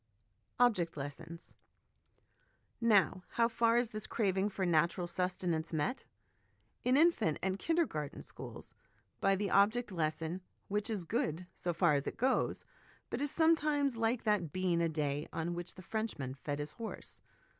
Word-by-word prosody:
Object 185 -11 +3
Lessons. 160 +4 -7 1.3
Now, 200 -5 +4
how 230 -1 +4
far 230 0 +3
is 240 -2 +1
this 215 -1 -4
craving 195 -2 +1
for 190 -1 -2
natural 170 +1 +2
sustenance 180 -2 -1
met? 160 - -1 0.8
In 255 +2 +4
infant 315 - +4
and 190 +1 0
kinder 335 0 +2
garten 150 - -5
schools, - - -10 0.5
by 195 0 +3
the 200 +1 -2
object 210 +3 +3
lesson, 165 +1 -2 0.3
which 210 +2 0
is 205 -6 -2
good 160 +2 -1
so 175 - -2
far 170 -2 +3
as 140 -1 0
it - - -4
goes, 260 +3 +1 0.5
but - - -2
is 290 - +1
sometimes 300 -4 +3
like 230 +1 0
that 205 -8 +1
bean 180 -1 +1
a 165 - +2
day 150 -1 -1
on 165 +1 -2
which 175 0 -6
the 185 - -11
Frenchman 195 - -3
fed 145 +2 -4
his 145 +1 -3
horse. 230 -2 -7
185 Hz, 155 wpm, -34 LUFS, 165-230 Hz, 1.3 s, Now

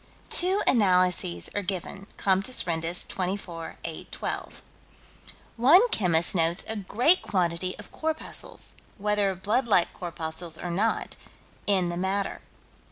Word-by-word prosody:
Two 375 +3 +4
analyses 180 - +3
are 205 - -1
given 195 +1 -5
(Comptes 195 +5 +3
Rendus, 165 0 +1
24 180 -3 -4
812). - - -5 0.9
One 320 - +6
chemist 175 - +1
notes 170 0 +1
a 220 - -4
great 235 - +3
quantity 180 -1 -1
of - - -12
corpuscles 315 0 -3 0.2
whether 205 -2 +1
blood 210 +7 0
like 180 -6 +3
corpuscles 165 -1 -4
or 175 - -5
not 210 +6 -1 0.5
in 190 -4 +2
the 175 - -4
matter. 195 +2 -2
190 Hz, 115 wpm, -26 LUFS, 175-210 Hz, 0.9 s, One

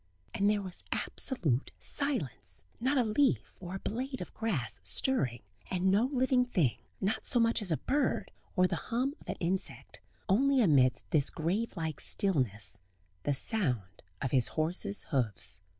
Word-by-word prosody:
And 200 +1 +2
there 210 -1 +1
was 185 -2 -7
absolute 150 - 0
silence 135 - -3 0.2
not 260 +4 +1
a 250 - +4
leaf 210 - +1
or 180 0 -6
a - - -4
blade 260 +6 -3
of - - -7
grass 170 - -2
stirring; 120 - +1 0.3
and 185 +1 +2
no 205 +5 +4
living 260 -1 +2
thing, 175 - +1 0.2
not 195 +3 -1
so 245 - +4
much 230 -1 +3
as 190 -4 0
a 155 - +2
bird, 285 +1 0 0.2
or 185 -2 +5
the - - 0
hum 255 +4 0
of - - -14
an - - -1
insect; 185 +3 -3 0.3
only 265 +7 +4
amidst 130 - +3
this 150 -5 +3
grave 190 +7 -2
like 160 -3 -3
stillness 115 - +1 0.5
the 145 - +2
sound 125 - -1 0.2
of 135 - -1
his 130 -4 +5
horse's 180 +6 0
hoofs. 105 - +1
185 Hz, 160 wpm, -31 LUFS, -, 0.5 s, or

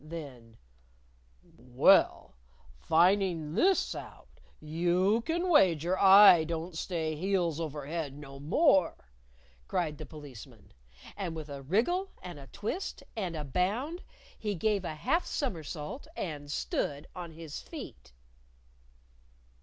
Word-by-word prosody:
Then, 135 -8 -9 0.9
"Well, 125 +1 +2 0.5
finding 170 - +2
this 380 - +2
out, - - -11 0.2
you 175 +7 +1
can 345 +3 0
wager 180 - +4
I 195 -3 +8
don't 165 +1 -4
stay 160 -2 -2
heels 175 -2 0
over 150 -3 -4
head 150 -2 -4
no 135 -2 -10
more!" 170 - +2 0.6
cried 155 -4 -2
the 155 - -7
Policeman. 145 -7 -12 0.4
And 180 -5 -4
with 155 -2 -7
a 140 -1 -7
wriggle 245 - 0
and 175 -5 -8
a 135 - -12
twist 215 - -5
and 185 -6 -3
a 155 - -4
bound, 210 - -1 0.4
he 210 -2 -2
gave 205 +2 0
a 155 - -4
half 305 - 0
somersault 175 - -4
and 145 -4 -5
stood 145 0 -2
on 175 -3 -7
his 160 -2 -8
feet! 65 -1 -10
165 Hz, 120 wpm, -30 LUFS, 150-195 Hz, 0.9 s, I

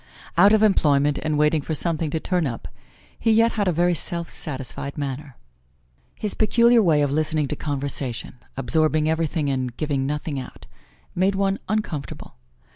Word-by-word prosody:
Out 200 +4 +6
of 220 0 +4
employment 145 -8 +3
and 155 -1 -1
waiting 150 +1 +3
for 155 +2 -3
something 165 0 0
to 160 - -2
turn 175 -2 0
up, 115 -3 -6 0.5
he 225 - +2
yet 225 +1 +4
had 205 -3 -1
a - - +3
very 175 +2 +2
self 170 +1 -3
satisfied 140 0 -5
manner. 140 -1 -5 0.8
His 210 - -2
peculiar 235 +2 +4
way 155 -7 +3
of 140 - 0
listening 155 0 0
to - - -2
conversation 135 -4 -3 0.2
absorbing 155 +3 +1
everything 160 -1 0
and 130 -3 -3
giving 140 -3 -1
nothing 150 -1 -3
out 125 - -10 0.5
made 190 +2 +1
one 195 0 0
uncomfortable. 180 -10 -4
155 Hz, 160 wpm, -23 LUFS, 140-180 Hz, 0.8 s, Out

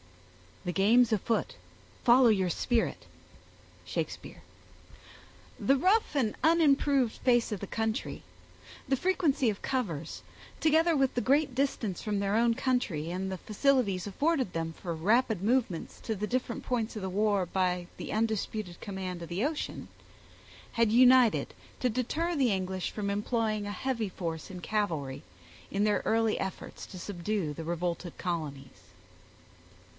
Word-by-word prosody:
The 180 - 0
game's 220 +6 +4
afoot; 220 +2 0 0.5
Follow 245 0 +6
your 190 -4 +2
spirit. 235 +6 0 0.8
—SHAKESPEARE. - - -5 1.2
The 275 - +3
rough 370 +4 +2
and 235 -7 +1
unimproved 285 -6 +3
face 240 -2 +2
of 210 - -2
the 200 - -6
country, 225 +1 -2 0.7
the 270 - +2
frequency 305 -6 +1
of 205 - -4
covers, 170 - -3 0.4
together 320 +2 +4
with 270 -2 +2
the 245 - +1
great 280 +1 +2
distance 255 -8 -1
from 210 -1 -1
their 200 +1 0
own 230 +1 +4
country, 235 - -1
and 190 +1 -3
the 190 - -3
facilities 215 -5 +1
afforded 270 - 0
them 165 0 -3
for 170 +1 -5
rapid 215 +4 +2
movements 220 -6 0
to 220 - -2
the 210 +1 -3
different 245 -1 -2
points 235 -2 -2
of 215 - -4
the 190 - -2
war, 200 0 +1
by 180 0 0
the - - -6
undisputed 215 -4 -2
command 185 -3 -5
of 170 - -8
the 180 +5 -1
ocean, 300 0 -3 0.9
had 230 -2 +2
united 250 0 +5 0.3
to 250 - +1
deter 300 +9 -1
the 265 -6 +3
English 185 -1 -2
from 205 -2 -3
employing 215 +1 -1
a - - -3
heavy 230 0 -2
force 165 -3 -5
in 180 -2 -8
cavalry, 165 -11 -2 0.5
in 200 +1 +1
their 210 -1 +2
early 225 -1 +2
efforts 190 - -5
to 185 - -9
subdue 180 -3 -2
the 165 - -6
revolted 170 +1 -3
colonies. 150 -7 -5
215 Hz, 145 wpm, -30 LUFS, 185-255 Hz, 1.2 s, Follow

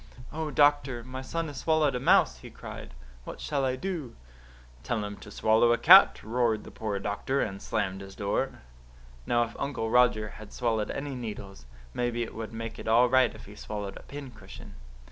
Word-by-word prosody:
"'Oh, 160 0 -3
doctor, 145 -5 +2
my 130 +2 -7
son 165 +5 -3
has 145 -3 -7
swallowed 155 -3 +2
a 125 - -2
mouse,' 130 - +4
he - - -11
cried. - - -10 0.3
'What - - -8
shall 140 -2 -1
I 130 -1 +1
do?' 160 -4 -5 0.7
"'Tell 105 - -2
him 105 0 -6
to - - -12
swallow 110 +2 +3
a - - +1
cat,' - - +7
roared 115 -1 0
the - - -11
poor 105 -2 -3
doctor, 105 +7 -2
and 100 -5 -2
slammed 95 0 -2
his 95 0 -10
door. 100 -1 -2 0.7
"Now, 120 0 +3
if 115 - -7
Uncle 115 -5 -2
Roger 120 -3 +3
has 110 +1 -12
swallowed 115 -4 0
any 140 0 -4
needles, 105 - -7 0.3
maybe 120 -1 -1
it 115 - -7
would 110 0 -6
make 115 0 -6
it - - -8
all 120 +3 +5
right 130 -1 +3
if - - -12
he 100 - -12
swallowed 105 -1 -6
a - - -10
pincushion." 140 -5 -11
120 Hz, 190 wpm, -28 LUFS, 105-130 Hz, 0.7 s, cat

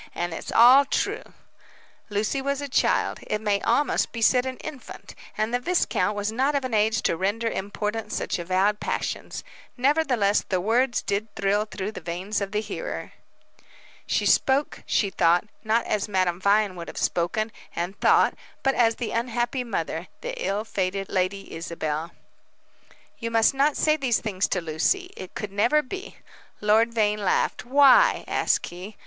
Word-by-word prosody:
"And 175 -1 -2
it's - - -6
all 250 +4 +7
true." 275 - -1 0.9
Lucy 215 +6 -1
was 280 0 -1
a 285 - -4
child 270 - +1
it 210 - -1
may 205 -2 0
almost 290 - +1
be 230 - -6
said 250 +3 +3
an 260 -1 -5
infant 295 -5 -9 0.2
and 215 +2 -1
the 245 - +2
viscount 245 - 0
was 205 +1 -2
not 265 +6 +1
of 275 -2 0
an 255 - -4
age 220 +1 +2
to - - +1
render 205 +6 -1
important 210 +1 -3
such - - -2
avowed 190 +4 +1
passions. - - -4 0.3
Nevertheless, 255 -7 +2
the 185 - +1
words 240 +6 +1
did 200 +2 -1
thrill 200 +2 +1
through 210 -1 -5
the 220 - -8
veins 180 +5 -3
of 195 -1 -3
the 210 0 0
hearer. 210 -1 -6 0.9
She - - 0
spoke, 275 +2 +2
she 200 -3 +1
thought, 175 +1 +3 0.2
not 225 +1 +1
as 210 -1 -1
Madame 185 -3 0
Vine 200 0 +2
would 170 -1 -7
have - - -9
spoken 215 +6 -1 0.2
and 175 +3 -3
thought, - - +4 0.3
but 270 - +3
as 230 -3 +3
the 235 -2 -4
unhappy 240 +2 -1
mother, 170 -6 -3
the - - -4
ill 205 +2 -1
fated 195 -1 -2
Lady 195 +1 -2
Isabel. 165 -1 -4 1.1
"You 230 - -3
must 225 +1 +3
not 280 +2 +2
say 305 0 +3
these 255 -6 +1
things 200 -4 -1
to 180 - -1
Lucy. 360 - -1
It 185 - -10
could 210 -2 -5
never 240 +10 +2
be." 385 - -8 0.4
Lord 220 +3 +3
Vane 210 -2 +1
laughed. 185 - 0
"Why?" 285 - +5
asked - - +1
he. 185 +4 -9
215 Hz, 165 wpm, -25 LUFS, 195-250 Hz, 1.1 s, all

